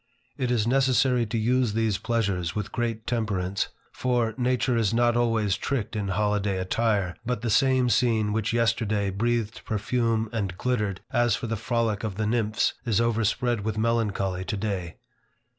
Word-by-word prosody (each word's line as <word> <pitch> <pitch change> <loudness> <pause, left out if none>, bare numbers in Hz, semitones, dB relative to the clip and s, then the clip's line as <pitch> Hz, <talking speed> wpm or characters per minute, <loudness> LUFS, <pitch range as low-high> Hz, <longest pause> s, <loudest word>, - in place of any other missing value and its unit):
It 130 -3 -2
is 115 -4 +1
necessary 130 -1 +3
to 115 - -2
use 120 0 +1
these 110 -2 0
pleasures 100 -7 -1
with 105 - -3
great 115 -2 -2
temperance. 100 -5 -1 0.2
For, 120 -3 0
nature 125 0 +1
is 115 -1 +1
not 120 0 +3
always 115 -5 +2
tricked 120 -6 -2
in 105 -2 -2
holiday 105 0 0
attire, 100 -1 0
but 120 -2 -2
the 115 - 0
same 130 +1 +3
scene 110 -2 +2
which 110 0 0
yesterday 110 -3 +1
breathed 115 +2 -1
perfume 110 +1 0
and 100 -5 -2
glittered 105 -6 -1
as 120 -3 +3
for 110 - -5
the 115 0 -2
frolic 115 -1 -1
of 105 -4 -3
the 110 +1 -1
nymphs, 110 -1 +1
is 115 -3 +1
overspread 115 0 +1
with 110 +1 -3
melancholy 105 -5 0
today. 95 -3 -3
110 Hz, 160 wpm, -26 LUFS, 105-120 Hz, 0.2 s, necessary